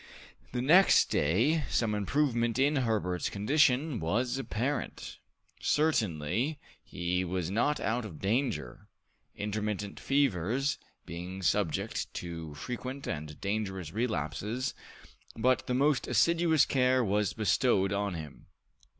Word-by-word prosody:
The 125 0 -2
next 180 +8 +6
day 115 - +2
some 110 -3 +1
improvement 120 +2 0
in 145 +3 +3
Herbert's 105 -8 0
condition 135 +4 +2
was 120 +11 0
apparent. 135 +2 -3 0.4
Certainly, 115 - 0 0.3
he 90 +2 -2
was 90 -1 -2
not 120 +8 +1
out 120 +2 -1
of 90 -8 -8
danger, 100 - -2 0.5
intermittent 105 -1 -3
fevers 135 - +1 0.3
being 90 +3 -7
subject 95 -4 0
to 80 -3 -6
frequent 130 - -6
and 75 0 -5
dangerous 95 -5 -3
relapses, 110 - -2 0.6
but 125 +3 +2
the 125 - 0
most 140 +1 +2
assiduous 170 -3 +3
care 130 -1 +2
was 105 -1 0
bestowed 105 -2 +2
on 100 -2 -1
him. 80 -3 -9
110 Hz, 110 wpm, -30 LUFS, 90-130 Hz, 0.6 s, next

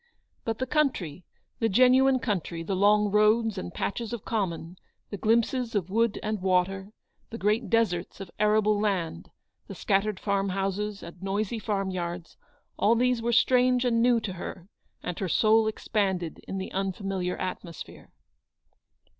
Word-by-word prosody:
But 225 -1 -1
the 260 - -2
country, 245 - -1 0.3
the 225 - +1
genuine 255 +4 +5
country, 180 -8 -3
the 190 +3 -2
long 205 +1 +3
roads 215 +1 +3
and 180 - -6
patches 230 +6 -3
of 235 - -6
common, 180 -5 -3 0.3
the 205 - -4
glimpses 230 +3 +1
of 190 -3 -1
wood 230 0 +1
and 215 -2 -2
water, 190 +1 +1 0.4
the 230 - -6
great 215 +3 0
deserts 190 -8 0
of 190 -3 -8
arable 210 0 +3
land, 185 - -2 0.4
the - - -8
scattered 195 0 0
farm 200 -1 0
houses, 195 +2 -2
and 170 +1 -11
noisy 205 +3 -2
farm 195 -2 -2
yards; 175 -1 -5 0.4
all 225 +3 +4
these 250 0 +2
were 235 +1 0
strange 250 +1 +3
and 230 -2 +2
new 240 -1 +4
to 200 -4 -4
her, 180 0 -7 0.4
and 180 - -4
her 190 - -2
soul 220 +4 +4
expanded 190 -6 -1
in 195 - -4
the 190 - -5
unfamiliar 190 -1 -2
atmo 180 -2 -5
sphere. - - -11
205 Hz, 155 wpm, -27 LUFS, 185-230 Hz, 0.4 s, genuine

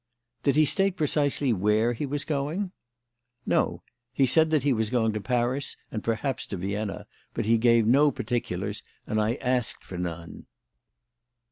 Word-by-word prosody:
"Did 140 -2 +2
he 155 0 +5
state 195 +3 +1
precisely 145 -4 +1
where 105 +4 +2
he 140 +5 -3
was 145 +1 -2
going?" 155 +6 -2 0.7
"No. - - 0 0.3
He 135 - +3
said 160 +5 +4
that 155 -4 +2
he 140 -2 +3
was 110 -2 0
going 115 -3 +1
to 105 - -3
Paris 125 +4 -1
and 110 - -4
perhaps 115 +4 -2
to 100 - -4
Vienna, 100 +3 -3 0.3
but - - -1
he 115 +1 +3
gave 115 -1 +4
no 140 +6 +5
particulars 120 -3 -3 0.2
and 110 0 0
I 110 +3 +1
asked 125 -3 -1
for 90 - -7
none." 85 -1 -6
125 Hz, 160 wpm, -27 LUFS, 110-145 Hz, 0.7 s, he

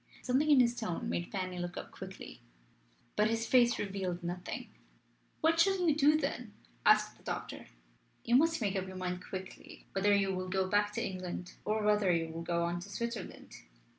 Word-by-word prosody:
Something 265 +5 +2
in 285 -4 +7
his 240 -1 +2
tone 220 -8 -3
made 175 - -3
Fanny 185 -2 -3
look 175 0 -4
up - - -7
quickly. - - -9 0.7
But 210 +1 +3
his 225 0 0
face 240 0 +4
revealed 190 -3 -3
nothing. 175 +1 -5 0.7
"What 325 +1 +3
shall 370 0 +3
you 305 - +4
do 300 +1 +5
then?" 250 -7 -3 0.3
asked - - +5
the - - -22
doctor. - - -5 0.6
"You 235 - +3
must 320 +2 +4
make 200 -2 0
up 190 -1 -2
your 185 0 -8
mind 180 0 -3
quickly 190 -1 -8
whether 200 +1 +2
you 195 -1 +1
will 185 0 -3
go 190 0 +1
back 205 +2 +2
to - - -1
England 180 -1 -5
or 215 0 0
whether 210 -3 +3
you 165 -1 0
will 165 +1 -6
go 170 0 0
on 170 +1 -1
to 180 +4 -9
Switzerland. 235 +3 -5
200 Hz, 190 wpm, -32 LUFS, 180-240 Hz, 0.7 s, in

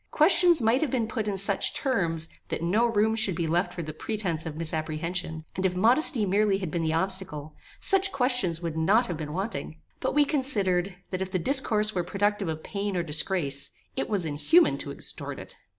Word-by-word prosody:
Questions 340 -2 +5
might 230 +4 +3
have 310 - 0
been 235 -3 -1
put 220 -1 -3
in 200 -2 -1
such 200 +1 +2
terms, 170 - 0 0.2
that - - -4
no 210 +8 +2
room 220 -1 +1
should 220 -5 +2
be 170 -1 -2
left 170 +4 0
for 170 - -6
the 155 0 -6
pretence 175 -3 -3
of 155 - -6
misapprehension, 160 +1 -3
and 185 - -3
if 185 -1 0
modesty 235 - +4
merely 200 +1 +2
had 185 -5 -5
been 170 - -2
the 160 -1 0
obstacle, 165 -3 -2 0.3
such 390 0 +3
questions 245 - 0
would 165 -2 -3
not 200 +10 +3
have 175 -6 -4
been 150 -2 -6
wanting; 165 - -5 0.2
but - - -2
we 295 -1 +5
considered, 200 - +1 0.2
that, 185 0 -3
if 190 - -3
the 185 - -1
disclosure 215 - +1
were 180 - -1
productive 205 +1 -1
of 155 0 -5
pain 200 -1 -3
or 175 - 0
disgrace, 150 -3 -1 0.3
it 135 - -2
was 195 -5 -1
inhuman 160 - +3
to - - -6
extort - - -5
it. - - -10
190 Hz, 200 wpm, -26 LUFS, 165-220 Hz, 0.3 s, Questions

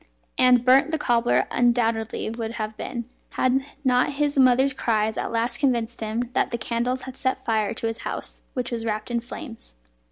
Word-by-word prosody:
And 250 -1 +5
burnt 265 +4 +5
the 320 - 0
cobbler 240 -4 +2
undoubtedly 230 -2 +1
would 225 0 -4
have 215 -1 -4
been, 235 +1 -5 0.3
had 255 +1 +2 0.3
not 250 +2 +3
his 290 0 0
mother's 265 0 +4
cries 220 -3 0
at - - -3
last 235 +1 0
convinced 240 -4 0
him 225 +3 -2
that - - +1
the 235 - -2
candles 240 +3 -2
had 260 -1 -8
set 260 -1 0
fire 220 -1 0
to 230 - -3
his 225 0 -2
house, - - -5
which 250 -2 -2
was 230 -1 -3
wrapped 215 +1 -3
in 235 - +1
flames. 235 - -9
240 Hz, 185 wpm, -24 LUFS, 225-255 Hz, 0.3 s, And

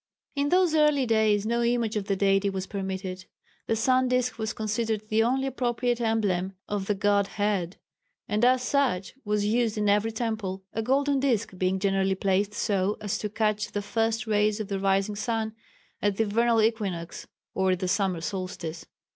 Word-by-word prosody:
In 285 0 +1
those 360 -1 +3
early 300 -3 +4
days 215 -3 +2
no 235 +2 +1
image 235 -2 +1
of 205 -2 -1
the 200 - +1
Deity 195 +1 +2
was 190 -1 -3
permitted. 190 -2 -5 0.4
The 225 - +1
sun 255 +3 +2
disk 250 -2 0
was 220 0 -1
considered 220 0 -2
the 220 +1 +3
only 260 +4 +1
appropriate 245 -2 -1
emblem 200 -5 0
of 200 -2 -3
the 210 - +1
godhead, 200 -2 0 0.5
and 210 +2 0
as 255 0 +4
such 255 -10 0
was 210 -1 0
used 225 0 +1
in 210 -1 +1
every 210 +2 +2
temple, 220 -4 -3
a 225 - -1
golden 275 +4 +2
disk 235 -7 0
being 185 +1 0
generally 195 0 +1
placed 200 +2 0
so 200 -1 0
as 205 -2 -2
to 210 - -3
catch 215 0 -1
the 205 - -2
first 225 +1 0
rays 210 0 +1
of 215 - -4
the 195 -1 -2
rising 195 +1 +1
sun 220 0 -2 0.5
at 205 -1 +1
the 225 - +2
vernal 230 +1 +2
equinox 195 -7 -2 0.3
or 190 0 +1
at 180 - -3
the 185 - -2
summer 190 -3 0
solstice. 175 -3 -5
210 Hz, 180 wpm, -27 LUFS, 195-230 Hz, 0.5 s, early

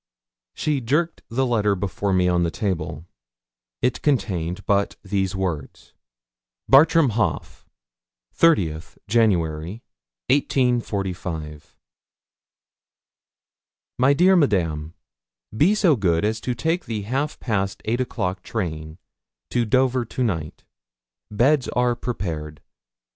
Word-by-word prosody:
She 150 -3 -1
jerked 150 +8 0
the 130 +3 0
letter 105 -5 +1
before 100 +1 -2
me 90 -1 +3
on 90 -1 +2
the 85 - +1
table. 80 -6 -3 0.8
It 125 - +1
contained 90 - -1
but 100 0 +1
these 95 -2 -1
words: 85 -7 -4 0.7
Bartram 150 +1 +6
Haugh: 105 -8 -2 0.7
'30th 85 - +2
January, 95 -3 0 0.5
1845. 95 - -1 2.2
'MY 130 +3 +5
DEAR 185 +5 +5
MADAME, 85 - +1 0.6
'Be 170 - +4
so 185 -8 +4
good 90 -4 +1
as 110 +1 -1
to 125 +2 -2
take 165 +8 -1
the 110 -3 -4
half 135 +8 -2
past 100 -5 -2
eight 120 +3 0
o'clock 95 -7 -3
train 80 -8 -5 0.5
to 120 -1 +1
Dover 130 +2 +2
to 120 +3 -3
night. 80 -10 -3 0.7
Beds 125 +5 +2
are 125 0 +1
prepared. 80 -11 -5
105 Hz, 105 wpm, -23 LUFS, 85-130 Hz, 2.2 s, Bartram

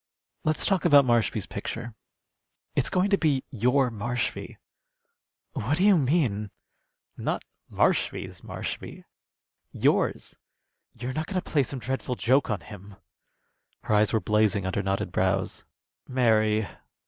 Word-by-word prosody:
Let's 155 0 +1
talk 195 -2 +1
about 145 -5 +6
Marshby's 115 -4 +1
picture. 115 +3 -6 0.8
It's - - +2
going 185 +2 +1
to 200 - +4
be 145 -5 +1
your 125 +2 +2
Marshby." 120 +3 -3 1.0
"What 135 +9 -1
do 185 - +1
you 205 -1 +6
mean?" 130 - +1 0.7
"Not - - -2 0.3
Marshby's - - 0
Marshby - - -6 0.7
yours." - - 0 0.6
"You're 125 +2 -5
not 155 +2 -3
going 190 -2 -1
to - - -10
play 145 - +2
some 135 +1 -4
dreadful 130 0 -3
joke 130 +4 +2
on 105 -3 -1
him?" 100 -1 -12 0.9
Her - - -1
eyes 105 0 +4
were 110 - +2
blazing 105 0 +1
under 95 +2 -1
knotted 95 -2 -2
brows. 95 +1 0 0.4
"Mary!" 110 -4 +2
120 Hz, 130 wpm, -26 LUFS, 105-140 Hz, 1.0 s, about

